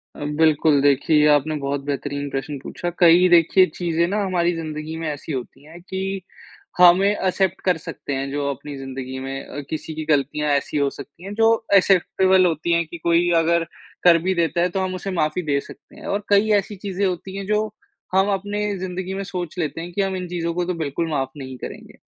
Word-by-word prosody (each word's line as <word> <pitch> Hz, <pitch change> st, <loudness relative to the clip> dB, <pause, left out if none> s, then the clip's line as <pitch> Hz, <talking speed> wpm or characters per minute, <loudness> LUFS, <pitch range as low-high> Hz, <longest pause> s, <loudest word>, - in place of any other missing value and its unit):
अ, -, -, -12 dB, 0.2 s
बिल्कुल 155 Hz, -2 st, +4 dB
देखिए 150 Hz, +2 st, +4 dB
आपने 150 Hz, +1 st, +3 dB
बहुत 140 Hz, 0 st, -1 dB
बेहतरीन 145 Hz, 0 st, -3 dB
प्रश्न 135 Hz, +2 st, -4 dB
पूछा। 175 Hz, +5 st, -5 dB
कई 175 Hz, +1 st, +6 dB
देखिए 175 Hz, +2 st, +6 dB
चीज़ें 170 Hz, -1 st, 0 dB
ना 205 Hz, +3 st, -1 dB
हमारी 175 Hz, -2 st, +1 dB
ज़िंदगी 155 Hz, -1 st, -5 dB
में 165 Hz, 0 st, -4 dB
ऐसी 150 Hz, +1 st, -6 dB
होती 130 Hz, +1 st, -6 dB
हैं 165 Hz, +3 st, -12 dB
कि 190 Hz, +1 st, -5 dB, 0.8 s
हमें 180 Hz, +2 st, +6 dB
एक्सेप्ट 190 Hz, -2 st, 0 dB
कर 180 Hz, -3 st, +3 dB
सकते 150 Hz, -2 st, -6 dB
हैं 135 Hz, 0 st, -2 dB
जो 145 Hz, 0 st, -2 dB
अपनी 140 Hz, +1 st, -6 dB
जिंदगी 130 Hz, -1 st, -6 dB
में 135 Hz, +1 st, -5 dB
अ, -, -, -7 dB
किसी 155 Hz, 0 st, -5 dB
की 155 Hz, 0 st, -5 dB
ग़लतियाँ 145 Hz, +1 st, 0 dB
ऐसी 140 Hz, +1 st, 0 dB
हो 140 Hz, -1 st, +2 dB
सकती 145 Hz, +5 st, -12 dB
हैं 200 Hz, -, -6 dB
जो 225 Hz, +1 st, +4 dB, 0.3 s
एक्सेप्टेबल 190 Hz, 0 st, +4 dB
होती 165 Hz, 0 st, 0 dB
हैं 170 Hz, 0 st, +2 dB
कि 170 Hz, -, -8 dB
कोई 170 Hz, +1 st, +2 dB
अगर 170 Hz, +1 st, +2 dB, 0.4 s
कर 175 Hz, -2 st, +7 dB
भी 190 Hz, +1 st, +1 dB
देता 170 Hz, 0 st, +1 dB
है, 180 Hz, -, +2 dB
तो 190 Hz, -, -2 dB
हम 185 Hz, -1 st, -1 dB
उसे 195 Hz, +1 st, -5 dB
माफ़ी 160 Hz, 0 st, 0 dB
दे 140 Hz, -, +2 dB
सकते -, -, -14 dB
हैं -, -, -11 dB
और 205 Hz, +1 st, -1 dB
कई 205 Hz, +1 st, +4 dB
ऐसी 200 Hz, +2 st, -7 dB
चीज़ें 195 Hz, 0 st, -3 dB
होती 190 Hz, +1 st, -3 dB
हैं 195 Hz, -, -5 dB
जो 210 Hz, 0 st, +2 dB, 0.5 s
हम 190 Hz, +1 st, +4 dB
अपने 205 Hz, +2 st, -3 dB, 0.2 s
ज़िंदगी 185 Hz, 0 st, -4 dB
में 195 Hz, +1 st, -3 dB
सोच 180 Hz, -3 st, -5 dB
लेते 165 Hz, 0 st, -2 dB
हैं 175 Hz, -, -7 dB
कि 200 Hz, -, 0 dB
हम 195 Hz, -1 st, -1 dB
इन 180 Hz, -1 st, -4 dB
चीज़ों 170 Hz, -1 st, -3 dB
को 175 Hz, +1 st, -1 dB
तो 180 Hz, -, -1 dB
बिल्कुल 165 Hz, 0 st, -2 dB
माफ़ 135 Hz, -4 st, -1 dB
नहीं 130 Hz, -2 st, -7 dB
करेंगे। -, -, -9 dB
170 Hz, 210 wpm, -22 LUFS, 145-185 Hz, 0.8 s, कर